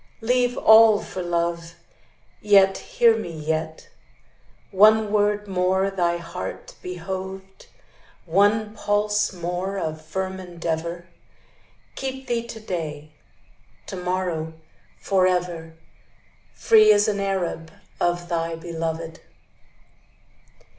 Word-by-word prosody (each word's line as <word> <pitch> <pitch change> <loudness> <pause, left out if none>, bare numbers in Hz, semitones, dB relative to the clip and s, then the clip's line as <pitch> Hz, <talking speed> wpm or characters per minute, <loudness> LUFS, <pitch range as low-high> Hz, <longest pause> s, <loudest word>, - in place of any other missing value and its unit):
Leave 245 +1 +1
all 220 -1 +7
for 185 - -6
love; 170 -1 -2 0.7
Yet, 195 -2 +4
hear 480 -2 +3
me, - - -5
yet, 160 +1 -3 0.8
One 215 +2 +5
word 210 0 +1
more 190 +1 +1
thy 175 -3 0
heart 170 +1 -7
behoved, 190 +2 -7 0.6
One 205 +5 +2
pulse 210 0 0
more 180 +2 -4
of 155 -3 -4
firm 190 +4 -4
endeavor, 170 -1 -4 0.9
Keep 265 0 -5
thee 235 -1 -2
to 230 - -8
day, 155 -7 -5 0.7
To - - -7
morrow, 180 -3 -2 0.5
forever, 180 -4 0 0.8
Free 215 -1 +6
as 205 0 +4
an 205 -2 0
Arab 185 -4 -2 0.3
Of 175 0 0
thy 165 -1 -2
beloved. 165 -1 -5
185 Hz, 100 wpm, -23 LUFS, 170-205 Hz, 0.9 s, all